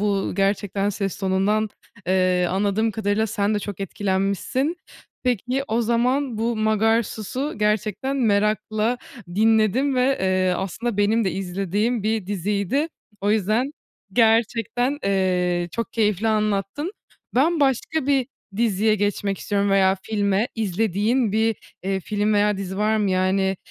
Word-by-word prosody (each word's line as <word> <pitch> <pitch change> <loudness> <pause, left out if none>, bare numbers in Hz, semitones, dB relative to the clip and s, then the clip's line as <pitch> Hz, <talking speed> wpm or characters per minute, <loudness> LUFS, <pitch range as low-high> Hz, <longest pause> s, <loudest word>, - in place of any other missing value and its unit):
bu 200 -2 0
gerçekten 200 0 0
ses 195 -2 -3
tonundan, 200 +3 +1 0.4
eee, 185 -1 +2
anladığım 200 +4 +1
kadarıyla 215 +1 0
sen 210 -1 0
de 210 - +1
çok 205 -1 -6
etkilenmişsin. 200 - -1 0.5
Peki, 250 +2 0
o 225 +2 +1
zaman 245 +2 +1
bu 230 +1 0
Magarsus'u 220 +4 0
gerçekten 215 +5 0
merakla 215 0 +1 0.4
dinledim 225 +5 +3
ve, 255 +2 +2
eee, 185 -1 +2
aslında 200 +4 -3
benim 215 +2 +2
de 190 - +1
izlediğim 195 +5 -1
bir 215 -2 -1
diziydi. 205 - -1 0.3
O 205 - +1
yüzden 220 +6 +1 0.4
gerçekten, 230 +4 +2
eee, 180 -3 +1
çok 230 0 -4
keyifli 210 -1 +1
anlattın. 215 - -1 0.4
Ben 310 +5 +3
başka 275 +2 +1
bir 270 -3 +2 0.3
diziye 215 -1 +2
geçmek 205 -1 -1
istiyorum 200 -1 0
veya 190 -1 +4
filme. 205 0 0
İzlediğin 220 +2 0
bir, 220 0 +2 0.3
eee, 195 0 -1
film 210 +2 0
veya 205 0 +3
dizi 190 -1 -5
var 215 +1 +2
mı? 205 -3 +1
Yani, 190 +1 +1
210 Hz, 130 wpm, -23 LUFS, 195-230 Hz, 0.5 s, veya